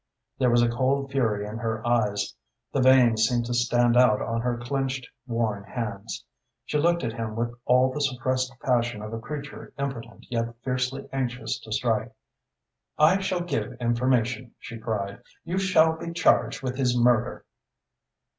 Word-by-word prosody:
There 130 -2 +4
was 120 0 +4
a - - +4
cold 135 +3 0
fury 110 -7 0
in 105 +2 -6
her 110 0 -3
eyes. 105 -4 +1 0.4
The 135 - +2
veins 125 -4 +5
seemed 120 0 0
to 120 - -3
stand 120 0 +3
out 120 -4 +5
on 115 0 -2
her 120 0 -1
clenched, 130 +1 -2 0.2
worn 115 -4 -1
hands. 105 -1 -5 0.4
She 150 - 0
looked 170 +1 +2
at 115 -2 -2
him 115 -2 -4
with 120 +1 -2
all 130 +1 +4
the 150 - -3
suppressed 130 -1 0
passion 120 -4 +1
of 110 +1 -6
a 115 - -3
creature 140 +3 -7
impotent 130 -5 -5
yet 115 0 -1
fiercely 130 +1 -2
anxious 125 -2 -2
to - - -12
strike. - - 0 0.9
"I 165 +6 +5
shall 190 -2 -1
give 125 -10 -2
information," 120 0 0
she 115 - -9
cried. 100 -3 -3 0.2
"You 175 +3 -2
shall 160 -4 +4
be 170 +1 -6
charged 170 - +2
with 130 -1 -3
his 125 -2 +1
murder!" 120 0 +2
120 Hz, 165 wpm, -26 LUFS, 115-135 Hz, 0.9 s, veins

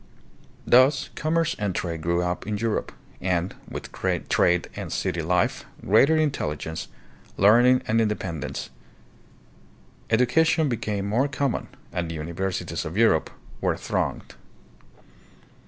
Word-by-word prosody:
Thus 130 +3 +4
commerce 165 +1 0
and 100 -4 -1
trade 85 -3 -3
grew 85 +2 +1
up 90 +2 -3
in 105 -1 -1
Europe, 115 0 -1 0.3
and, 90 -1 0 0.2
with - - -7
trade 90 -1 +1
and - - -6
city 90 -3 -1
life, 85 +2 +1 0.2
greater 135 +10 +5
intelligence, 80 - -2 0.5
learning, 120 +6 +5
and 115 +1 +3
independence. 95 -8 -3 1.4
Education 145 +7 +3
became 105 -4 -2
more 120 +7 +1
common, 140 -2 -2 0.3
and 85 -2 -2
the 85 - -5
universities 85 +4 -3
of 80 +5 -6
Europe 110 -9 +3 0.3
were - - +1
thronged. - - -3
105 Hz, 115 wpm, -25 LUFS, 85-125 Hz, 1.4 s, greater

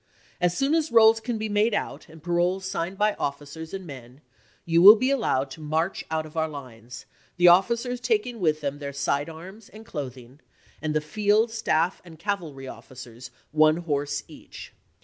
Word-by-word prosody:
As 180 0 +1
soon 275 +2 +1
as 320 -4 +1
rolls 225 -1 +6
can 230 0 -3
be 220 0 -3
made 210 +1 +1
out, - - -4
and 160 -1 -15
paroles 175 +2 0
signed 190 0 -3
by 210 +1 +2
officers 145 +3 -5
and 190 -1 -6
men, 130 -2 -11 0.4
you 165 0 +3
will 205 +4 +11
be 255 +4 0
allowed 140 - 0
to 145 - -10
march 160 +4 -1
out 160 0 -2
of 155 - -13
our 160 0 0
lines, 125 -5 -10 0.3
the 175 0 +5
officers 235 +7 +3
taking 250 - -1
with 155 -4 +1
them 145 0 -3
their 140 -1 -6
side 140 +2 -1
arms 190 +7 -11
and 220 +1 -13
cloth 140 - -6
ing, 125 +3 -15 0.4
and 155 -1 -2
the 155 - +2
field, 210 +7 +1
staff, 180 -6 0
and 170 -3 -14
cavalry 165 -8 -4
officers 125 -2 -11 0.2
one 155 +1 +4
horse 145 -4 -2
each. - - -12
165 Hz, 185 wpm, -25 LUFS, 145-210 Hz, 0.4 s, will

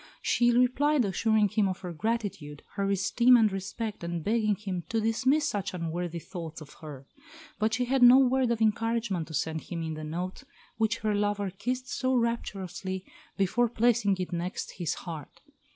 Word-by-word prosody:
She 240 0 +3
replied, 250 +3 +3
assuring 215 +1 +2
him 205 0 +2
of 185 - -5
her 180 -2 -5
gratitude, 190 -7 -3
her 200 -1 -1
esteem 235 +6 +4
and 220 -3 +4
respect, 200 +2 -5
and 170 -1 -3
begging 215 0 +1
him 190 -4 -4
to 225 - 0
dismiss 260 +7 +2
such 200 -5 -3
unworthy 170 0 -3
thoughts 165 -1 -7
of 155 -2 -12
her. 145 -4 -9 0.5
But 220 +1 +1
she 250 +1 0
had 265 +1 +1
no 245 +1 +9
word 260 -1 +3
of 230 -1 +1
encouragement 220 -5 0
to 160 - -6
send 160 +1 -1
him 170 -2 -5
in 160 -1 -3
the 155 0 -6
note 180 - -5 0.3
which 220 -1 +1
her 215 -1 +1
lover 205 -1 0
kissed 250 +7 -3
so 260 0 0
rapturously 195 -5 -2 0.3
before 215 +5 +2
placing 230 -4 +2
it 185 -1 -4
next 175 +3 -4
his 170 -4 -1
heart. 160 -5 -8
205 Hz, 175 wpm, -28 LUFS, 175-235 Hz, 0.5 s, no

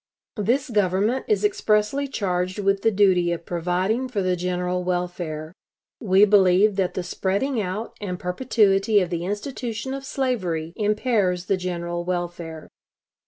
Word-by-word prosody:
This 245 +6 0
Government 205 +4 +1
is 425 -1 +1
expressly 275 - +1
charged 185 -6 -2
with 195 -1 +1
the 225 - +4
duty 190 -4 +3
of 170 -1 -4
providing 180 +8 -1
for 205 -6 -1
the 185 0 +1
general 180 0 -2
welfare. 175 -3 -3 0.5
We 195 -2 +5
believe 195 0 +4
that 190 -2 0
the 185 - -2
spreading 215 +8 -1
out 210 +5 -4
and 180 -3 -3
perpetuity 205 +1 +2
of 180 -2 -2
the 170 0 -2
institution 230 +4 -4
of 275 0 -5
slavery 185 - -2
impairs 210 -4 0
the 195 - +2
general 175 -1 -3
welfare. 175 -3 -4
190 Hz, 140 wpm, -23 LUFS, 180-220 Hz, 0.5 s, We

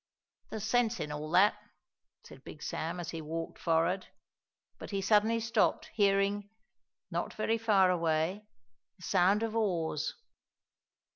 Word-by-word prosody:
"There's 215 - -5
sense 235 0 +1
in 150 -1 -4
all 150 +1 -5
that," 185 +5 +4 0.6
said - - -14
Big - - -10
Sam 170 +3 -3
as 170 - -5
he 165 - -5
walked 165 +2 -5
forward. 170 +3 +1 0.7
But - - -8
he 200 - -2
suddenly 215 +3 +3
stopped, 225 0 +1
hearing, 200 0 +2 0.6
not - - -3
very 225 +1 0
far 200 -5 +4
away, 170 +4 0 0.5
the 185 - -16
sound 195 +4 +3
of 225 -1 -2
oars. 165 -8 -1
195 Hz, 135 wpm, -31 LUFS, 165-215 Hz, 0.7 s, that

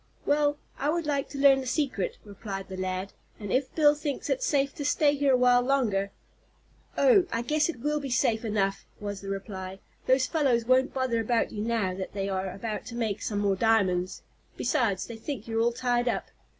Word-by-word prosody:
"Well, 290 0 +2 0.2
I 285 - 0
would 335 +1 0
like 280 -2 -1
to 280 - -7
learn 275 -1 +5
the 260 - -6
secret," 255 - -1
replied 195 -1 -7
the 190 - -6
lad, 185 +1 -3 0.3
"and 205 -3 -4
if 260 +1 0
Bill 295 -2 +6
thinks 295 -2 -4
it's - - 0
safe 280 -1 +1
to 290 - -6
stay 290 0 +3
here 285 -2 +2
a - - +3
while 250 0 +5
longer 240 -7 +1 0.4
" - - -33
"Oh, 415 -7 +5
I 230 - -1
guess 305 +5 +1
it 250 -8 -5
will 300 +2 0
be 280 -2 -5
safe 235 -2 +1
enough," 200 -3 -1
was 205 -1 -5
the 195 - -7
reply. 195 -1 -5 0.3
"Those 260 0 +4
fellows 260 -8 +1
won't 255 +2 +3
bother 260 -3 0
about 225 +1 +1
you 210 - -4
now 220 -4 0
that 190 0 -6
they 195 -1 -2
are 190 -1 -2
about 210 +3 -5
to 235 - -7
make 220 -4 -2
some 205 - -2
more 200 -1 +2
diamonds. 190 -4 +1 0.3
Besides, 230 -6 0
they 230 - -8
think 235 -1 -6
you're 225 0 0
all 235 +1 +3
tied 245 0 0
up. - - -1
235 Hz, 210 wpm, -28 LUFS, 200-275 Hz, 0.4 s, Bill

